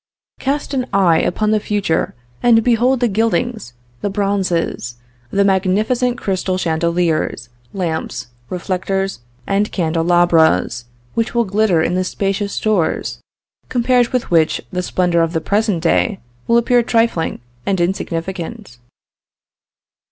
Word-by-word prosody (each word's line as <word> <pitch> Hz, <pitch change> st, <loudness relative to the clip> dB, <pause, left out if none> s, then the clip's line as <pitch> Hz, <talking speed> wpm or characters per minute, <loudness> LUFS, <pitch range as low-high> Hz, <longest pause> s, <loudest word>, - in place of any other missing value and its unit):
Cast 280 Hz, +2 st, -2 dB
an 255 Hz, -2 st, -1 dB
eye 175 Hz, -5 st, +4 dB
upon 215 Hz, +4 st, 0 dB
the 215 Hz, -, +3 dB
future 205 Hz, -6 st, -1 dB, 0.3 s
and 230 Hz, -2 st, +5 dB
behold 245 Hz, +2 st, +3 dB
the 245 Hz, -, +4 dB
gildings, 225 Hz, -, -1 dB, 0.3 s
the 205 Hz, -, -1 dB
bronzes, 195 Hz, -, -1 dB, 0.3 s
the 200 Hz, -, +2 dB
magnificent 215 Hz, +6 st, +1 dB
crystal 190 Hz, -3 st, -1 dB
chandeliers, 170 Hz, -6 st, 0 dB, 0.2 s
lamps, 170 Hz, -4 st, -3 dB, 0.2 s
reflectors 190 Hz, -1 st, -2 dB, 0.3 s
and 200 Hz, +1 st, 0 dB
candelabras, 165 Hz, -, +2 dB, 0.3 s
which 230 Hz, +1 st, -1 dB
will 235 Hz, -1 st, +3 dB
glitter 195 Hz, -4 st, +2 dB
in 175 Hz, -, 0 dB
the 185 Hz, +1 st, +1 dB
spacious 195 Hz, +2 st, -2 dB
stores, 205 Hz, -7 st, 0 dB, 0.5 s
compared 245 Hz, 0 st, +3 dB
with 250 Hz, -5 st, -2 dB
which 160 Hz, -2 st, +3 dB
the 180 Hz, -, 0 dB
splendor 180 Hz, -1 st, +1 dB
of 165 Hz, 0 st, 0 dB
the 165 Hz, -, +1 dB
present 205 Hz, -1 st, 0 dB
day 90 Hz, -1 st, +2 dB, 0.3 s
will 235 Hz, -, +4 dB
appear 240 Hz, +1 st, +3 dB
trifling 230 Hz, -7 st, 0 dB, 0.3 s
and 195 Hz, -2 st, +1 dB
insignificant. 175 Hz, -, -3 dB
195 Hz, 120 wpm, -18 LUFS, 170-225 Hz, 0.5 s, and